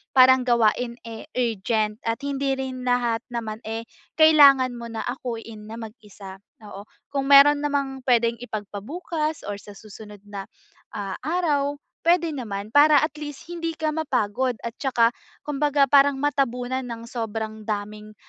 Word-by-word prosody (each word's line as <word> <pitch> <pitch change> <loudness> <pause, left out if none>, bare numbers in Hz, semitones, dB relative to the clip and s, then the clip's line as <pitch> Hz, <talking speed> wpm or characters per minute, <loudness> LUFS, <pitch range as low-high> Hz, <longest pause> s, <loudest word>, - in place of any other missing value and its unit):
parang 260 0 +6
gawain, 235 0 +2
eh, 225 +3 -9
urgent 220 -2 -1
at 230 +1 -1
hindi 275 -1 -1
rin 260 -1 -5
lahat 240 -2 +1
naman, 225 -2 -4
eh, 225 +1 -4 0.3
kailangan 285 -5 +7
mo 235 -1 -7
na 225 -1 -5
akuin 230 -4 -6
na 225 - -8
mag-isa, 210 -4 -11 0.2
oo. 205 0 -10 0.2
Kung 275 -1 -1
mayro'n 285 +1 +8
namang 280 -2 -2
puwedeng 235 -2 +2
ipagpabukas 280 - -4
or 205 0 -5
sa 205 0 -13
susunod 210 -1 -12
na, 200 -1 -7 0.5
ah, 195 -2 -4
araw 290 -2 0 0.3
puwede 335 -1 +3
naman. 215 -6 -5
Para 295 +3 +6
at 310 - 0
least 295 -2 -7
hindi 330 -1 -4
ka 315 -1 -1
mapagod 255 -5 -1
at 235 - -3
saka 240 -4 +2 0.3
kumbaga 290 -1 +1
parang 280 0 +6
matabunan 260 -3 -1
ng 230 -1 -7
sobrang 220 -2 -5
daming, 210 0 -5
245 Hz, 145 wpm, -24 LUFS, 220-280 Hz, 0.5 s, mayro'n